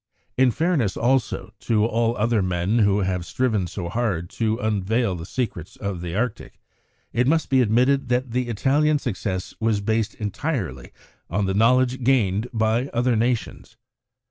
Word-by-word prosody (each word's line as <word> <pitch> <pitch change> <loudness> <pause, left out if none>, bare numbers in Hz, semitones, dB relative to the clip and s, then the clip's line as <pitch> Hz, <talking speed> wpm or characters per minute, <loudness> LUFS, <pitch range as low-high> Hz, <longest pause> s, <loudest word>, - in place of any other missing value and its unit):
In 130 0 +4
fairness, 150 - 0
also, 120 -3 0
to 110 -2 +1
all 115 +1 0
other 110 0 +2
men 90 +4 0
who 100 -1 +3
have 90 -2 -1
striven 110 -1 0
so 85 -1 -5
hard 95 -4 -2
to 110 -1 0
unveil 110 0 0
the 85 -1 -7
secrets 100 -10 -4
of 100 -4 -4
the 85 0 -5
Arctic, 115 +1 -3 0.5
it 125 +1 +2
must 160 0 +1
be 130 -1 +5
admitted 125 +4 +2
that 125 0 0
the 125 +1 -1
Italian 145 +7 +2
success 100 -8 -4
was 110 -2 +1
based 110 +1 -1
entirely 105 - -4 0.4
on 100 +2 0
the 95 - 0
knowledge 125 +4 +3
gained 115 -4 +2
by 115 +2 +1
other 120 -1 +1
nations. 120 +1 -2
115 Hz, 155 wpm, -23 LUFS, 100-125 Hz, 0.5 s, be